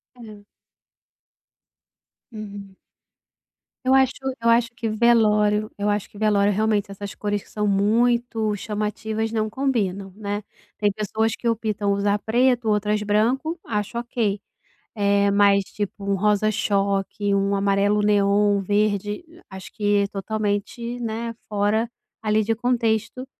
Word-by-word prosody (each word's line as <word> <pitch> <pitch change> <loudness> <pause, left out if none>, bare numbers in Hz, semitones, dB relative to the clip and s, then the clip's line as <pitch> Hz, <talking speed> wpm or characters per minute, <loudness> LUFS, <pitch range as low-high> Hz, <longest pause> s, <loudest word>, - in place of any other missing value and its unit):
É. 215 -4 -12 1.9
Hum. 200 -3 -9 1.1
Eu 260 - +4
acho 265 0 +4 0.3
eu 230 - +2
acho 235 0 +4
que 230 -1 -4
velório 215 -2 +3
eu 205 +1 0
acho 205 -1 -1
que - - -16
velório, 205 -1 +2
realmente, 215 -1 +1
essas 200 0 -7
cores 205 -1 -3
que - - -22
são 210 -1 -2
muito 220 +2 +1
chamativas 215 +2 -3
não 215 -1 0
combinam, 205 -7 -1
né. 205 -1 -4 0.4
Tem 210 - +2
pessoas 220 +2 -1
que 235 - -1
optam 215 -3 -1
usar 200 +1 +1
preto, 240 +1 +2
outras 210 0 +1
branco, 250 +11 0
acho 210 +1 -3
ok. 235 -4 -1 0.6
Eh, 200 0 +3
mas, 200 0 +4
tipo, 205 0 -5
um 200 0 +1
rosa 210 +2 +2
choque, 200 -1 0
um 200 0 +1
amarelo 200 +1 +2
neon, 205 0 +3
verde, 205 - 0 0.2
acho 190 -1 -10
que 205 -1 +1
totalmente, 215 +4 -3
né, 230 0 -3 0.2
fora 210 +2 +1 0.3
ali 215 0 +1
de 225 +2 0
contexto 240 +1 0
210 Hz, 130 wpm, -23 LUFS, 200-225 Hz, 1.9 s, Eu